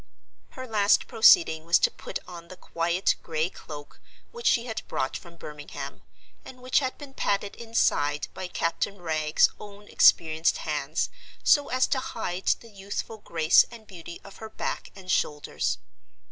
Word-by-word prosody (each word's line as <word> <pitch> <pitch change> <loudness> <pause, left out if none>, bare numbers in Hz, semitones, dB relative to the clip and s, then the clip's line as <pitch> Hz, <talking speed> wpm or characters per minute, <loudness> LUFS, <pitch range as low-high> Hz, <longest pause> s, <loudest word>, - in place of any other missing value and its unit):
Her 260 - -5
last 210 -4 +3
proceeding 165 -7 +5
was 170 +1 +4
to - - +2
put - - -6
on 170 -1 -10
the 185 - -11
quiet 170 +3 0
gray 160 +2 -2
cloak 145 -1 -11 0.3
which 475 0 -3
she 235 - +3
had 225 -3 -4
brought 130 - -2
from 170 -2 -9
Birmingham, 150 -2 -8 0.4
and 255 - -12
which 255 0 +2
had 260 -2 -3
been 285 -2 -11
padded 200 -4 -1
inside 150 -11 0
by 185 - -5
Captain 180 +3 -2
Wragge's 155 -2 +2
own 205 0 -12
experienced 160 0 +4
hands, - - -1 0.3
so 290 -1 +4
as 255 +1 +3
to 265 - 0
hide 185 -7 -5
the 230 - -14
youthful 205 +2 -6
grace 165 -4 +4
and 230 -2 -12
beauty 175 -4 -10
of 200 - -13
her 220 - -8
back - - -4
and 185 -2 -6
shoulders. 150 -1 0
185 Hz, 160 wpm, -27 LUFS, 165-225 Hz, 0.4 s, proceeding